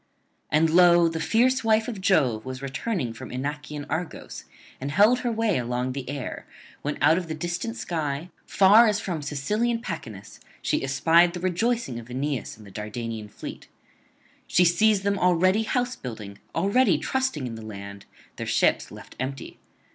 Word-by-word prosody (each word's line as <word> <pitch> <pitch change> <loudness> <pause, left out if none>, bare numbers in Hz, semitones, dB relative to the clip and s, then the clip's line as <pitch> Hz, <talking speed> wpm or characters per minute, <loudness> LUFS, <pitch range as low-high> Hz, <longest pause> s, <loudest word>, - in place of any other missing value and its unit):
And 155 +1 +3
lo! 175 0 +6
the 165 0 -3
fierce 250 +8 +2
wife 220 0 +3
of 220 -6 -5
Jove 135 - +2
was 130 +1 -7
returning 135 - -2
from 130 +2 -9
Inachian 145 +2 -5
Argos, 165 +2 -5 0.3
and 135 - -4
held 210 - +4
her 245 -2 -1
way 225 - +1
along 125 +1 -2
the 130 -1 -6
air, 140 -2 -5 0.3
when 145 +1 -3
out 160 +4 +5
of 175 - -7
the 160 - -4
distant 175 +8 -3
sky, 160 0 -3 0.2
far 210 +4 +6
as 210 -1 +1
from 170 -5 -3
Sicilian 210 +12 -1
Pachynus, 125 - -7 0.2
she - - 0
espied 165 +6 +4
the 180 - -5
rejoicing 185 - -1
of 120 +1 -12
Aeneas 135 0 -3
and 110 - -14
the 100 - -13
Dardanian 110 +1 -5
fleet. - - -9 0.8
She 180 - +4
sees 195 +4 +3
them 200 0 0
already 180 +3 +3
house 245 +2 -1
building, 105 -5 -8 0.2
already 200 +10 +3
trusting 265 - -1
in 120 - -5
the 115 - -8
land, 100 -2 -9 0.3
their - - -5
ships - - +2
left - - -12
empty. 130 +1 -5
160 Hz, 165 wpm, -25 LUFS, 130-200 Hz, 0.8 s, lo